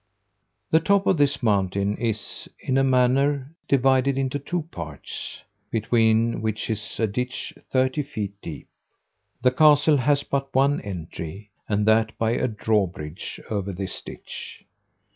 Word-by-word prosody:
The 160 - +6
top 200 +3 +2
of 190 - +3
this 145 -1 +2
mountain 100 -1 +1
is, 110 -3 -3
in 135 0 +1
a - - +4
manner, 135 +2 +2 0.2
divided 135 0 +3
into 135 +1 -1
two 170 +4 -2
parts, 75 -4 -7 0.3
between 115 0 +2
which 110 0 -2
is 105 -2 -4
a 115 - +3
ditch 125 +4 -3 0.2
thirty 130 +2 +2
feet 110 -8 -4
deep. 80 - -8 0.8
The 125 - +5
castle 150 +2 +5
hath 140 +2 +2
but 135 -1 -2
one 140 +2 +3
entry, 95 +1 -7 0.2
and 105 0 +1
that 110 0 +3
by 115 0 +1
a 120 - +1
drawbridge 100 -7 -2
over 100 -2 -1
this 95 0 -4
ditch. - - -9
115 Hz, 140 wpm, -24 LUFS, 105-135 Hz, 0.8 s, The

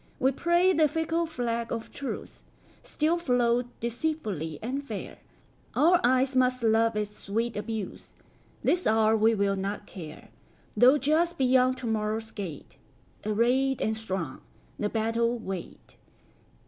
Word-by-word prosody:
We 265 +1 +3
pray 345 +6 +3
the 315 -3 +4
fickle 325 +2 -1
flag 235 -6 -3
of 225 - -4
truceStill 310 +3 -4
float 245 -4 +2
deceitfully 225 - -2
and 265 +5 -3
fair; 220 -7 -7 0.6
Our 345 +3 +5
eyes 260 +2 +3
must 255 -1 +2
love 225 0 +3
its 210 0 -3
sweet 225 +3 -2
abuse; 210 -1 -5 0.5
This 360 +1 +2
hour 220 0 +4
we 220 +1 +3
will 200 -1 +1
not 195 +2 -4
care, 160 -5 -10 0.5
Though 255 +4 +6
just 325 +5 +1
beyond 255 0 +3
to 255 - -7
morrow's 220 0 -2
gate, 180 -9 -7 0.5
Arrayed 250 +5 +2
and 220 - 0
strong, 190 -10 -4 0.4
the 210 - 0
battle 230 +2 0
wait. 190 -6 -8
235 Hz, 130 wpm, -28 LUFS, 215-270 Hz, 0.6 s, Though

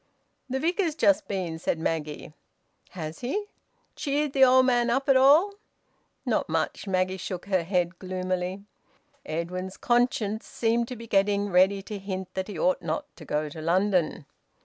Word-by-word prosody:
"The 265 +1 -1
Vicar's 335 +1 0
just 300 -1 +3
been," 180 -5 -3
said 160 - -1
Maggie. 155 -2 -3 0.6
"Has 160 -3 -6
he?... 405 +13 -2 0.5
Cheered 290 0 -1
the 270 - +5
old 260 0 +6
man 240 -2 +2
up 265 +3 0
at 270 - +5
all?" 295 +10 +6 0.7
"Not - - 0
much." - - -2
Maggie 185 0 0
shook 180 -1 -5
her 190 -2 +1
head 175 0 -1
gloomily. 185 0 -3 0.6
Edwin's 180 +4 -4
conscience 240 -3 +1
seemed 230 0 0
to 250 - -6
be 230 0 -9
getting 200 -1 +1
ready 190 +2 +4
to 205 0 -6
hint 190 -1 -5
that 190 0 -3
he 205 -5 -7
ought 185 +3 +1
not 160 -2 -4
to - - -12
go 150 +1 -1
to 155 +2 -8
London. 175 -2 +1
195 Hz, 160 wpm, -27 LUFS, 180-245 Hz, 0.7 s, old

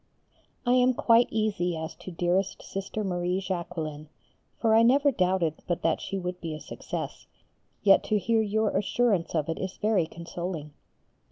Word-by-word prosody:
I 245 - +3
am 250 0 +4
quite 230 +1 +5
easy 205 -6 0
as 160 0 -5
to 175 +2 -9
dearest 185 +3 0
Sister 195 +2 -4
Marie 180 -1 -1
Jacqueline, 165 -5 -4 0.5
for 225 -2 +2
I 225 - +7
never 275 +5 +5
doubted 180 - 0
but 175 - -1
that 165 -1 +1
she 195 - -4
would 180 -1 -4
be 160 -2 -4
a - - -7
success, - - -6 0.6
yet 195 -2 +6
to 215 - +2
hear 220 +3 +2
your 215 0 0
assurance 200 -3 +1
of 155 -2 0
it 165 - -3
is 190 0 -4
very 205 -6 +2
consoling. 170 -2 -6
185 Hz, 165 wpm, -27 LUFS, 170-215 Hz, 0.6 s, I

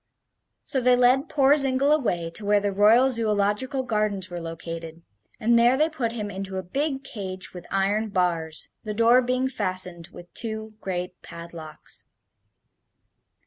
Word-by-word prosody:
So 265 - -1
they 250 0 +5
led 250 +4 +3
poor 280 0 +4
Zingle 275 0 +3
away 180 - 0
to 210 - -8
where 205 0 +3
the 205 0 -1
Royal 220 +7 +5
Zoological 225 +4 +1
Gardens 210 -6 -2
were 175 -1 -5
located, 165 0 -7 0.4
and 235 +1 +3
there 240 +2 +4
they 310 +3 +2
put 245 -8 -3
him 210 -3 -4
into 190 0 -5
a 190 - -3
big 275 - -2
cage 190 -6 -4
with 175 -1 -10
iron 205 +3 0
bars, 170 -4 -1
the 210 -2 -5
door 235 +3 +5
being 255 +1 0
fastened 185 -8 0
with 175 0 -13
two 220 -1 -6
great 180 -1 -4
padlocks. 170 -2 -9
210 Hz, 150 wpm, -25 LUFS, 180-250 Hz, 0.4 s, they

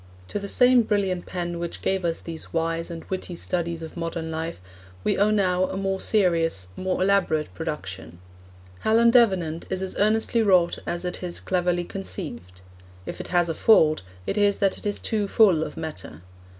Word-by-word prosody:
To - - -2
the 200 - -6
same 250 +3 +5
brilliant 195 -5 -1
pen 175 -1 -4
which 170 0 -5
gave 190 -1 0
us 165 -1 -1
these 165 -1 -8
wise 165 +1 -1
and 165 -1 -7
witty 185 -2 -4
studies 170 -1 -3
of 160 - -8
modern 165 -1 -4
life 160 +1 -4 0.4
we - - +1
owe 205 +2 +3
now 185 -3 +2
a - - -4
more 195 0 -1
serious, 165 - +1
more 185 0 -1
elaborate 180 - +1
production. 85 -1 -6 0.6
Helen 230 - +4
Davenant 190 -9 +2
is 190 0 -2
as 190 - -2
earnestly 220 +2 +2
wrought 185 -5 +3
out - - -19
as 175 +1 -2
it 180 - -4
is 175 -2 -5
cleverly 180 -1 0
conceived. 145 - -7 0.4
If - - -5
it - - -9
has 175 -1 +2
a 165 - -1
fault, 155 -6 +4 0.2
it 205 - -1
is 205 -1 +3
that 195 -1 +2
it - - -5
is 205 - -1
too 210 -2 -1
full 195 -7 +4
of - - -7
matter. 155 - -6
180 Hz, 185 wpm, -25 LUFS, 165-200 Hz, 0.6 s, same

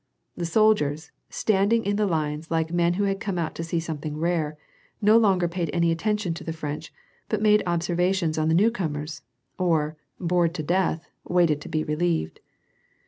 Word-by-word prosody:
The 170 - -3
soldiers, 165 -7 +2 0.2
standing 215 +2 +1
in 205 +1 +1
the 210 0 +1
lines, 155 -2 -2
like 165 0 -1
men 175 0 +2
who 205 - 0
had 195 -1 0
come 195 -3 -3
out 165 -2 -2
to 165 - -5
see 165 0 -1
something 155 -2 -5
rare, 160 -2 -1 0.4
no 215 +1 +5
longer 195 -6 +4
paid 170 -1 -3
any 170 -1 +2
attention 205 +1 -1
to 165 - -8
the 165 - -4
French, 150 -2 -5 0.4
but - - 0
made 210 0 +4
observations 175 -1 0
on 155 - +1
the 160 - +3
new 210 +6 +4
comers, 155 -7 -4 0.4
or, 160 -4 +1 0.2
bored 175 -1 +1
to 155 - -3
death, 175 0 0 0.2
waited 170 -4 +2
to - - -8
be 155 0 0
relieved. 155 - -1
170 Hz, 180 wpm, -25 LUFS, 155-190 Hz, 0.4 s, no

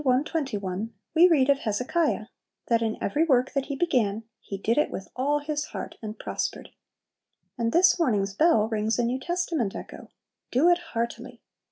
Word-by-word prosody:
21, 245 - -1 0.2
we 335 +3 +7
read 290 -7 +4
of 280 -1 +3
Hezekiah, 250 +3 0 0.4
that 230 -1 +3
"in 220 -1 -1
every 295 +11 +1
work 260 -5 +2
that 275 -1 -1
he 280 - -3
began, 230 -10 +1 0.2
he 195 - -7
did 225 +7 +1
it 300 - +2
with 190 - -6
all 280 +3 +1
his 295 0 -3
heart, - - -7
and 215 -1 -6
prospered." - - -4 0.9
And 230 -2 -1
this 360 +3 +5
morning's 205 -11 +1
"bell" 225 -3 +3
rings 220 0 0
a 240 - +1
New 245 +3 -1
Testament 335 - -1
echo, - - -9 0.4
"Do 285 +8 +4
it 350 0 +4 0.2
heartily!" 235 +1 -3
255 Hz, 170 wpm, -26 LUFS, 220-305 Hz, 0.9 s, we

